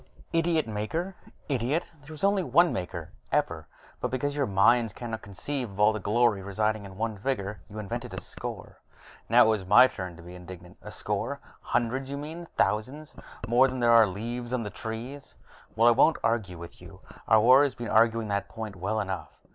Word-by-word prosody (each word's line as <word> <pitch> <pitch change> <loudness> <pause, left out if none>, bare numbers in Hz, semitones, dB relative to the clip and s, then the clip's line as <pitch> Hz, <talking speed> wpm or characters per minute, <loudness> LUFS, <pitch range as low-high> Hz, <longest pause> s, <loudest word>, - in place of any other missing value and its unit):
"Idiot 165 -4 +1
Maker? 160 - -3 0.3
Idiot! 135 +4 0 0.2
There 145 +2 -14
was 155 - -9
only 200 0 +3
one 175 -1 +3
Maker, 85 -3 -5 0.2
ever, - - -1 0.3
but 125 - -2
because 140 +3 -2
your 140 -3 0
minds 110 +3 +3
cannot 115 0 -6
conceive 115 +6 -5
of 100 0 -12
all 105 +1 +5
that 110 - -4
glory 110 0 +2
residing 105 +2 -1
in 95 -1 -11
one 110 -1 -3
figure, 105 -4 -3
you 105 - -10
invented 105 -2 -5
a - - -4
score." - - -8 0.5
Now - - +7
it - - +3
was 110 -3 +1
my 105 +7 +7
turn 90 -8 -5
to 85 - -13
be 90 +1 -11
indignant. 90 0 -11
"A - - -9
score? - - -3 0.2
Hundreds, 125 +3 -1
you 140 - -4
mean; 160 +4 -7
thousands 130 +9 -1 0.3
more 120 +3 +5
than 130 0 -4
there 120 -1 +4
are 115 -2 +7
leaves 120 +5 -5
on 125 -2 0
the 105 - -6
trees." 120 +5 -7 0.4
"Well, 115 +1 +4
I - - +8
won't 145 +7 +4
argue 110 -6 0
with 85 0 -11
you. - - -13 0.3
Our 110 - +6
war 130 +5 +7
has 140 - -1
been 120 -1 -6
arguing 115 0 +3
that 100 0 -2
point 110 -3 -7
well 105 +4 -2
enough." 95 -3 -4
115 Hz, 195 wpm, -27 LUFS, 100-130 Hz, 0.5 s, I